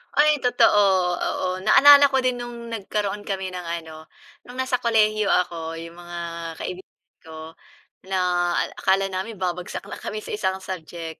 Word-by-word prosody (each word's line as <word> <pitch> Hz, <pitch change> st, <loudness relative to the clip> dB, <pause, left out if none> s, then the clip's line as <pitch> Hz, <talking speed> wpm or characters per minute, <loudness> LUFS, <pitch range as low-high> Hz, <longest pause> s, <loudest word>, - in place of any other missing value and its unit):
Ay, 300 Hz, 0 st, +4 dB
totoo, 235 Hz, -4 st, +4 dB, 0.4 s
oo. 185 Hz, -, -2 dB
Naalala 285 Hz, +5 st, +8 dB
ko 265 Hz, -, +1 dB
din 250 Hz, -1 st, 0 dB
nung 235 Hz, -1 st, -8 dB
nagkaroon 205 Hz, -1 st, -3 dB
kami 190 Hz, -1 st, -3 dB
ng 180 Hz, -1 st, -7 dB, 0.2 s
ano, 160 Hz, 0 st, -12 dB, 0.4 s
nung 250 Hz, +1 st, -11 dB
nasa 260 Hz, -1 st, 0 dB
kolehiyo 215 Hz, -2 st, +2 dB
ako, 165 Hz, -2 st, 0 dB
'yung 165 Hz, +1 st, -9 dB
mga 175 Hz, 0 st, -8 dB, 0.4 s
kaibigan 180 Hz, -1 st, -9 dB
ko 160 Hz, 0 st, -9 dB, 0.5 s
na 180 Hz, -2 st, 0 dB
al -, -, 0 dB
akala 195 Hz, +1 st, +2 dB
namin 190 Hz, +4 st, -4 dB
babagsak 180 Hz, -1 st, -4 dB
na -, -, -7 dB
kami 215 Hz, 0 st, -5 dB
sa -, -, -9 dB
isang 190 Hz, -2 st, -2 dB
subject, 165 Hz, -3 st, -7 dB
190 Hz, 155 wpm, -23 LUFS, 175-230 Hz, 0.5 s, Naalala